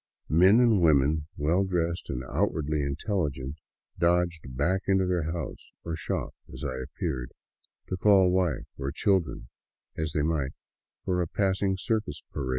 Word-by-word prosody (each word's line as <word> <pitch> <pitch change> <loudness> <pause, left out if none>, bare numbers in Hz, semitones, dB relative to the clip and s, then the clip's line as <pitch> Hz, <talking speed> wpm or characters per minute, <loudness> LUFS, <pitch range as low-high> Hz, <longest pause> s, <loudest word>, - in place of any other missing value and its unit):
Men 95 +8 +6
and 115 -6 +4
women, 75 -1 +3
well 80 +6 +2
dressed 85 -2 -1
and 65 - -3
outwardly 75 0 0
intelligent, 70 -2 -2 0.4
dodged 85 -6 +1
back 90 +7 +1
into 95 -1 +3
their 85 -3 0
house 85 -6 -6
or 85 -1 -3
shop 80 - -3 0.2
as 65 +3 -8
I 65 -3 -2
appeared, 65 -2 -4 0.6
to 90 - -2
call 95 -2 +5
wife 90 -7 +1
or 70 0 -2
children 85 - 0 0.5
as 80 -2 -2
they 75 - +1
might 75 -4 0 0.5
for 90 -1 +1
a 85 - -1
passing 95 +1 0
circus 110 +2 -2
parade. 65 - -3
85 Hz, 150 wpm, -28 LUFS, 70-95 Hz, 0.6 s, Men